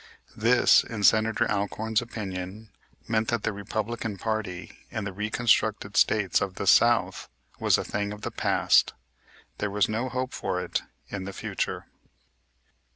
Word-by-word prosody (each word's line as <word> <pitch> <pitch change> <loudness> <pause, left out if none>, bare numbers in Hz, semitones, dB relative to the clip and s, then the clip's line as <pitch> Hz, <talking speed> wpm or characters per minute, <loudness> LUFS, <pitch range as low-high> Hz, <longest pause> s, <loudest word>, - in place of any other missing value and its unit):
This, 120 +3 +5
in 110 -3 -6
Senator 110 +2 +4
Alcorn's 105 +2 -1
opinion, 105 -2 -6 0.4
meant 110 -1 +1
that 115 -3 -1
the 110 - -1
Republican 105 +1 -4
party 105 -4 -4
in 110 - -4
the 100 -1 -5
reconstructed 105 0 +1
States 105 -4 +3
of 95 -1 -2
the 100 - -4
South 115 -3 +3 0.3
was - - +3
a - - -2
thing 105 0 -3
of 105 0 -8
the - - -4
past. - - +3 0.7
There 105 - -1
was 100 0 +2
no 115 +4 -2
hope 130 +1 -3
for 95 -1 -2
it - - -2 0.3
in 95 -2 -5
the 100 - -6
future. - - -3
105 Hz, 150 wpm, -27 LUFS, 100-110 Hz, 0.7 s, This